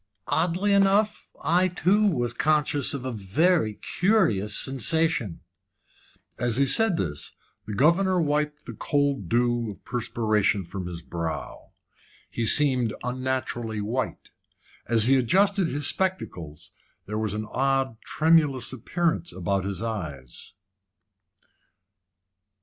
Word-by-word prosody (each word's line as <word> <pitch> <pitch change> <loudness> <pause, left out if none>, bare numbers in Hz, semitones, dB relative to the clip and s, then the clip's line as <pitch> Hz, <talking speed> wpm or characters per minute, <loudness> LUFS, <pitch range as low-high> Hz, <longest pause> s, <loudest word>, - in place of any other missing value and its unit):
"Oddly 180 +5 0
enough, 200 +2 +2
I 180 +3 +3
too 190 +4 +2
was 120 - -1
conscious 150 0 +1
of 130 -2 -6
a 130 - -2
very 110 - +1 0.2
curious 165 - +2
sensation." 135 - -1 1.0
As 120 -1 +1
he 140 - +3
said 205 - +4
this, 75 -5 -3 0.3
the 105 - -4
governor 180 - +3
wiped 150 -1 -1
the - - -7
cold 140 - -1
dew 120 -1 +1
of 100 - -11
perspiration 110 -5 0
from 90 +1 -6
his 85 -1 -7
brow. 85 -1 -6 0.6
He 115 -1 -2
seemed 130 -6 +5
unnaturally 125 -3 -3
white. 115 +5 -4 0.6
As 115 -2 +3
he 135 +2 +4
adjusted 190 - +2
his 145 0 -2
spectacles, 90 - -3 0.3
there 105 +1 -4
was 110 -2 -1
an 110 0 -3
odd, 135 -3 0
tremulous 150 -6 +2
appearance 170 +7 -2
about 95 +1 -2
his 100 0 -3
eyes. 75 - -6
130 Hz, 115 wpm, -25 LUFS, 105-165 Hz, 1.0 s, seemed